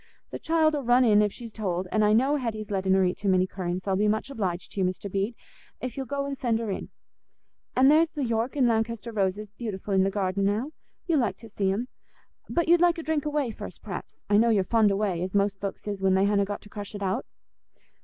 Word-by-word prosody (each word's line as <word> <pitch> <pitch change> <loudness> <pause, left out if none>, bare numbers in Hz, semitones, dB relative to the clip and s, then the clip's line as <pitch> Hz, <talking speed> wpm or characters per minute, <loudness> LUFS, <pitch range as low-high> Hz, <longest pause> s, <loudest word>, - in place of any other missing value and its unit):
The - - -5
child 320 -1 +2
'ull 290 - -1
run 245 +1 +4
in 210 -2 +5
if 210 -1 +2
she's 230 0 -10
told, 185 -4 -2
an' 215 - +2
I 210 0 +4
know 265 +7 +3
Hetty's 215 -5 -4
lettin' 190 -1 +2
her 190 -1 +4
eat 180 - -1
too 200 - 0
many 185 -1 +4
currants. 185 0 -4
I'll 190 - +2
be 210 +2 +2
much 220 +6 0
obliged 185 -8 -3
to - - -6
you, - - +2
Mr. 185 +2 -5
Bede, 200 +5 -1 0.4
if 255 -1 -5
you'll 270 -1 -4
go 280 0 -2
and 280 0 -3
send 240 -4 0
her 225 -2 -3
in; - - -5 0.9
an' 260 +1 +5
there's 315 +3 +5
the 295 -3 -4
York 230 +3 -1
and 265 -4 +3
Lankester 230 0 -1
roses 200 +1 -1
beautiful 205 -2 -5
in 190 - +4
the 195 - +2
garden 195 -1 -1
now—you'll 275 - -2
like 240 - 0
to 225 - -13
see 195 -2 0
'em. 225 +6 -2 0.6
But 340 -1 0
you'd 345 +1 +5
like 345 -1 +4
a 330 - -5
drink 310 -2 -1
o' - - +1
whey 290 -5 -1
first, - - -9
p'r'aps; - - -7
I 205 - +4
know 230 +2 +4
you're 205 -4 +3
fond 220 0 +3
o' - - +1
whey, 195 -4 -1
as 185 +2 -3
most 200 -1 +1
folks 200 +1 -5
is 200 -2 -3
when 190 -1 +3
they 190 +1 +3
hanna 200 -1 +2
got 205 +1 -5
to 205 - -14
crush 205 0 -7
it 200 - -5
out." 195 +6 -1
210 Hz, 255 wpm, -27 LUFS, 195-250 Hz, 0.9 s, in